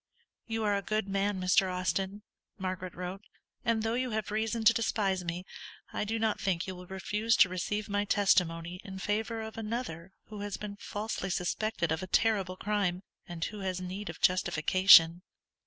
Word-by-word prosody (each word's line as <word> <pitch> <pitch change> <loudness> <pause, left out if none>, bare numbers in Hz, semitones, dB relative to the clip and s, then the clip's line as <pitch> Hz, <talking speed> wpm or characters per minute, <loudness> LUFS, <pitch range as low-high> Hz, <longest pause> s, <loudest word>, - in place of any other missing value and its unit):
"You 225 -1 -2
are 205 -1 +2
a 200 - 0
good 215 +1 -1
man, 195 0 0
Mr. 185 +1 +3
Austin," 190 +2 -2 0.3
Margaret 185 -1 -4
wrote; 180 +2 -5 0.4
"_and 225 -1 +1
though 225 0 0
you 255 +1 0
have 215 -2 -3
reason 220 +1 -1
to 225 +1 +7
despise 200 -5 0
me, 175 +1 -4 0.5
I - - -1
do 225 +2 -1
not 220 -1 0
think 185 -3 0
you 190 - -5
will 180 0 -11
refuse 210 +4 0
to 195 - +6
receive 200 +3 -2
my 205 0 0
testimony 180 -4 +2
in 190 -1 -8
favour 220 +3 -2
of 220 0 -7
another 210 -6 -4
who 210 -1 -9
has 205 -2 -4
been 205 0 -7
falsely 205 -3 -4
suspected 180 0 -1
of 160 +2 0
a 185 - -5
terrible 195 -3 +1
crime, 195 -3 -1 0.2
and 170 -1 -3
who 210 - -6
has 185 -2 -2
need 185 +3 -5
of - - -7
justification. 175 -1 +6
195 Hz, 180 wpm, -30 LUFS, 180-215 Hz, 0.5 s, to